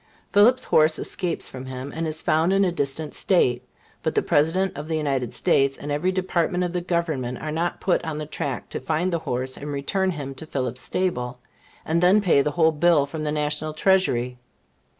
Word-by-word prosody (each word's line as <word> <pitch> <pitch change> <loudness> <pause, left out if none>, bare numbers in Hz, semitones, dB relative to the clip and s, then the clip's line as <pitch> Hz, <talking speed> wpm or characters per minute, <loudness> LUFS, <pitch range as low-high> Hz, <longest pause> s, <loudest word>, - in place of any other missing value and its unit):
Phillips's 240 +5 +5
horse 155 0 +4
escapes 180 -4 -2
from 130 0 -8
him, 130 +2 -6
and 165 0 -2
is 155 0 -4
found 160 +3 +2
in 195 0 +3
a 180 - +1
distant 145 -1 -2
State; 125 -10 +2 0.4
but - - -2
the - - +2
President 175 +6 +1
of 145 +2 -6
the 160 -1 -1
United 135 -6 -1
States, 135 0 +2
and 145 - -6
every 155 +6 +1
department 180 -1 0
of 175 0 -3
Government, 155 -8 -1
are 155 +4 -5
not 170 +3 -2
put 185 - +1
on 160 -2 -4
the 155 - -4
track 140 -3 -4
to - - -4
find 160 +7 -1
the 170 - +1
horse, 130 -2 -3
and 145 +1 -6
return 190 +7 0
him 145 -6 -4
to 145 +4 -10
Phillips's 130 -4 -3
stable, 125 -10 -2 0.5
and 165 +2 +1
then 185 +4 +6
pay 175 -8 +4
the 150 - 0
whole 160 +2 +3
bill 155 -1 +3
from 155 +2 -6
the 150 - -1
National 150 +1 -2
Treasury. 125 -10 +1
155 Hz, 200 wpm, -24 LUFS, 140-175 Hz, 0.5 s, then